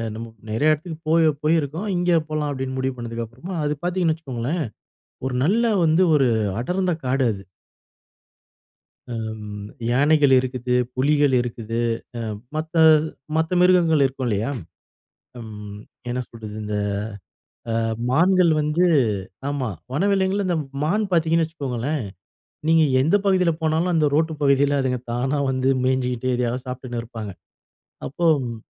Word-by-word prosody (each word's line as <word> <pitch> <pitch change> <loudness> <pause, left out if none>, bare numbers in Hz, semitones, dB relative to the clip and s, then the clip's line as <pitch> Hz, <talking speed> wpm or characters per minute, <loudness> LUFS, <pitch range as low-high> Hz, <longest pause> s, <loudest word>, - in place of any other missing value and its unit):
நம்ம 115 - -5 0.2
நெறைய 145 +8 +3
இடத்துக்கு 160 +2 -6
போயி 160 -1 +5
போயிருக்கோம். 160 +4 0
இங்கே 175 -1 +3
போலாம் 155 -1 -2
அப்படின்னு 130 -1 -4
முடிவு 130 0 -1
பண்ணுனதுக்கு 115 -1 -5
அப்புறம் 155 - -6
அது 150 0 0
பாத்தீங்கன்னு 175 -3 +1
வச்சுக்கோங்களேன், 140 +2 -3 0.6
ஒரு 125 - -3
நல்ல 225 +6 +2
வந்து 160 +4 +4
ஒரு 135 -4 +4 0.3
அடர்ந்த 180 +5 0
காடு 130 +1 +1
அது. 100 0 -9 1.7
அம், 110 -2 -5 0.2
யானைகள் 145 +2 +4
இருக்குது. 125 -1 -2 0.2
புலிகள் 145 +1 +3
இருக்குது. 115 -1 -4 0.6
அ - - -9 0.2
மத்த, 160 +2 -4 0.6
மத்த 160 +1 0
மிருகங்கள் 170 -5 +4
இருக்கும் 130 0 -3
இல்லையா, 110 +3 0 0.9
ம் 105 -2 -8 0.3
என்ன 125 - -2
சொல்றது 110 -2 -9
இந்த 105 0 -3 1.0
அ - - 0 0.4
மான்கள் 180 +4 +4
வந்து 150 +4 +1 0.7
ஆமா. 135 -4 -2 0.2
வனவிலங்குல 195 +3 +1
இந்த 175 - +1 0.3
மான் 205 +8 +1
பாத்தீங்கன்னு 165 -1 +3
வச்சுக்கோங்களேன். 140 -3 -3 0.6
நீங்க 160 0 +5 0.2
எந்த 160 +9 +3
பகுதியில 185 -3 +3
போனாலும் 160 +3 +1
அந்த 155 -2 +3
ரோட்டு 160 +2 +2
பகுதியில 140 0 +3
அதுங்க 130 -1 0
தானா 130 +4 0
வந்து 130 0 +1
மேய்ஞ்சுகிட்டு, 130 -1 0
எதையாவது 125 +1 -2
சாப்பிட்டுன்னு 125 -2 -5
இருப்பாங்க. 110 -3 -7 0.8
அப்போ 170 +6 -4 0.2
ம் 115 -1 -5
145 Hz, 130 wpm, -22 LUFS, 125-165 Hz, 1.7 s, போயி